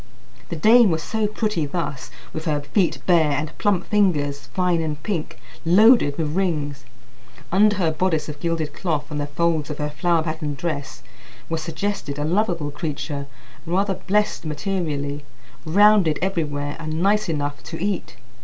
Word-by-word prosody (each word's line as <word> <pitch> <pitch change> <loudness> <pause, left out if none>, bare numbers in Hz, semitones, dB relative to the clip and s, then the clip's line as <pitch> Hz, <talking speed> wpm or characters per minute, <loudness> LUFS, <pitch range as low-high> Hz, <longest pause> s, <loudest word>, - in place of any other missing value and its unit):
The 170 - -3
dame 220 +6 +6
was 160 -2 -1
so 220 -1 0
pretty 210 -7 -1
thus, 140 -6 -4 0.2
with 160 - -5
her 150 -3 0
feet 170 +5 +1
bare, 160 -5 +4
and 145 +2 -3
plump 195 -3 +1
fingers, 145 - +1
fine 175 +6 +1
and 155 -2 -2
pink, 175 -7 -3 0.3
loaded 185 - +5
with 155 -1 -2
rings. 150 -8 -1 0.7
Under 205 +3 +5
her 175 -5 +1
bodice 160 -1 0
of 150 -1 -7
gilded 165 -2 -2
cloth 155 -4 -2
and 145 -1 -2
the 145 - -2
folds 160 0 0
of 150 - -5
her 150 0 -2
flower 170 +2 +1
patterned 155 -3 -3
dress 145 -3 -4 0.5
was 165 -1 -1
suggested 165 -2 -3
a 145 - -1
lovable 170 -4 0
creature, 145 -2 -4 0.4
rather 195 +3 +1
blessed 210 +3 0
materially, 150 -3 -3 0.4
rounded 195 -1 +5
everywhere, 150 -6 -2
and 155 +1 -3
nice 205 -1 +2
enough 145 -2 -2
to 165 - -6
eat. 190 -8 -2
160 Hz, 155 wpm, -22 LUFS, 145-190 Hz, 0.7 s, dame